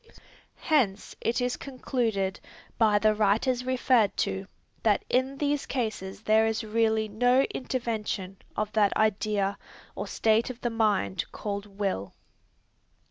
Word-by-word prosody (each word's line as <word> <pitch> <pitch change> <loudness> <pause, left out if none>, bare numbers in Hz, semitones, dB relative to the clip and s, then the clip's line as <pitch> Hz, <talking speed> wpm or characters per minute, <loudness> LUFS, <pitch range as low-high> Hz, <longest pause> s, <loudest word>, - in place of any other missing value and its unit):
Hence, 235 - +1
it 235 - 0
is 245 0 0
concluded, 230 -7 -2 0.4
by 215 -2 +5
the 215 +1 +3
writers 220 +5 +2
referred 250 -4 +2
to, 190 0 -1 0.3
that 210 -3 +2
in 260 +2 +1
these 290 0 0
cases 215 -5 -3
there 220 +1 +4
is 225 +1 -1
really 220 0 +1
no 245 +5 +3
intervention 220 -7 -3 0.2
of 215 0 -1
that 210 -2 +2
idea 205 -2 +1 0.3
or - - -5
state 220 +2 +2
of 250 -1 -7
the 240 - -1
mind 210 - +1
called 205 -1 -4
will. 195 - -3
220 Hz, 130 wpm, -28 LUFS, 205-245 Hz, 0.4 s, by